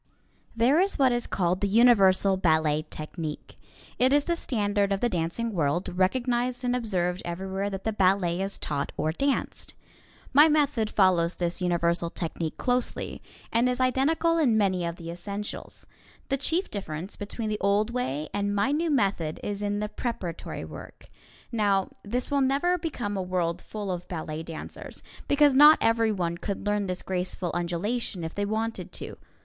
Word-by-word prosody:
There 245 +7 +4
is 390 +2 +1
what 265 -2 +4
is 240 0 -1
called 180 0 0
the 200 - +2
Universal 195 -4 +5
Ballet 155 -3 +2
Technique. 155 0 -6 0.4
It 255 +1 +4
is 290 0 +4
the 340 - 0
standard 205 -8 0
of 195 - +1
the 240 - +1
dancing 180 +6 -1
world, 170 +2 -1
recognized 245 +6 0
and 245 0 +1
observed 185 -6 -1
everywhere 190 +3 -3
that 195 -1 -6
the 220 - -1
ballet 185 -3 +2
is 195 +1 -3
taught 145 -2 -3
or 155 - 0
danced. 275 - -2 0.6
My 295 +4 +8
method 290 -8 +2
follows 180 -4 +3
this 175 +1 -2
Universal 170 -1 +1
Technique 165 -2 -4
closely, 250 -1 -1 0.3
and 235 +2 +3
is 250 +1 -1
identical 315 +6 +2
in 245 -8 +3
many 190 -4 +1
of 170 0 -3
the 170 -1 -7
essentials. 200 +4 -6 0.4
The 275 - +2
chief 330 +7 -1
difference 185 -2 -5
between 215 +2 -4
the 210 0 -2
old 205 +3 +2
way 155 - -2
and 205 0 -1
my 205 +7 +2
new 325 +3 0
method 195 - 0
is 205 0 -3
in 205 0 -1
the 210 - -2
preparatory 195 -9 -5
work. - - -11 0.5
Now, 200 -4 +1
this 245 +7 -2
will 280 -1 +2
never 280 +7 +2
become 270 - -3
a 190 - -1
world 180 -2 -1
full 205 -3 -5
of 175 -1 -5
ballet 160 -2 -4
dancers, 165 -1 -8 0.2
because 290 -1 +5
not 295 +3 +8
everyone 215 -7 +1
could 200 -1 -4
learn 205 -1 0
this 180 0 -4
graceful 180 -1 -2
undulation 175 +3 -2
if 160 - -5
they 205 - -1
wanted 220 +2 -3
to. - - -7
205 Hz, 165 wpm, -27 LUFS, 175-245 Hz, 0.6 s, My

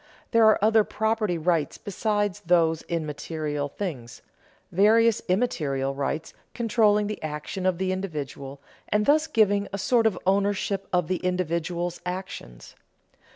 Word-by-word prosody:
There 230 -1 +5
are 215 - +6
other 220 0 +5
property 220 -4 -1
rights 165 -2 0
besides 205 -1 -1
those 165 -2 +3
in 165 -2 -3
material 150 -1 -3
things, 140 -11 -6 0.5
various 220 +4 +4
immaterial 145 - 0
rights 145 +3 -3 0.2
controlling 215 -3 +3
the 210 0 -5
action 155 +5 -4
of 185 -2 +1
the 190 0 -1
individual 145 -7 -5 0.3
and 210 0 +2
thus 305 +2 +3
giving 205 -7 +2
a 200 - -3
sort 225 +3 +3
of 220 - -1
ownership 195 0 0
of 180 -3 +1
the 185 +1 0
individual's 175 -1 -2
actions. 180 - -7
185 Hz, 135 wpm, -25 LUFS, 160-210 Hz, 0.5 s, are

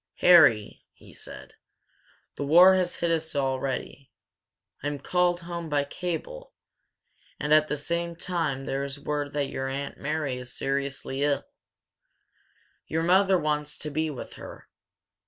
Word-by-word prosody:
"Harry," 120 -12 +6
he - - -17
said, - - -10 0.8
"the - - -4
war 175 +6 +7
has 180 -1 +1
hit 170 -1 -1
us 160 -1 -1
already. 135 0 -2 0.7
I'm 145 +1 -2
called 180 +3 +1
home 170 -1 -6
by 145 -1 +1
cable, 340 - -6 0.8
and 150 +1 +1
at 155 0 +5
the 150 - -2
same 170 +3 -2
time 165 -6 -2
there 135 +1 -2
is 140 0 -6
word 145 0 -3
that 145 -1 -1
your 135 - -3
Aunt 140 +1 -5
Mary 150 -3 -2
is 125 0 -8
seriously 140 0 -2
ill. 145 -1 +1 1.4
Your 160 +1 -1
mother 190 +2 +4
wants 150 -2 -2
to 150 - -6
be 155 +2 -1
with 140 -5 -7
her. - - -11
150 Hz, 140 wpm, -27 LUFS, 140-170 Hz, 1.4 s, war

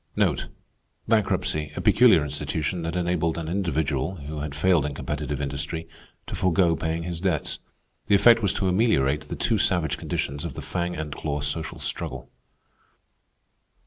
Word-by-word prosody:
Bankruptcy—a 95 -8 0
peculiar - - +5
institution 75 +4 -2
that 85 +1 -3
enabled 85 -2 0
an 80 -1 -4
individual, 80 -3 -1
who 75 -1 -6
had 75 -1 -4
failed 85 0 +3
in 75 -1 -3
competitive 70 +1 -3
industry, 70 +4 -3 0.4
to - - -7
forego 90 -2 +2
paying 80 +2 -2
his 85 -1 -4
debts. 90 -5 -1 0.5
The 100 - +5
effect 115 +3 +6
was 100 -4 +2
to 95 - 0
ameliorate 90 - +2
the - - -4
too - - +1
savage 85 -5 +1
conditions 70 +1 -3
of - - -5
the - - -5
fang 90 0 -2
and 75 -2 -4
claw 75 -1 -3
social 80 +3 -2
struggle. - - -4
80 Hz, 145 wpm, -25 LUFS, 75-90 Hz, 0.5 s, effect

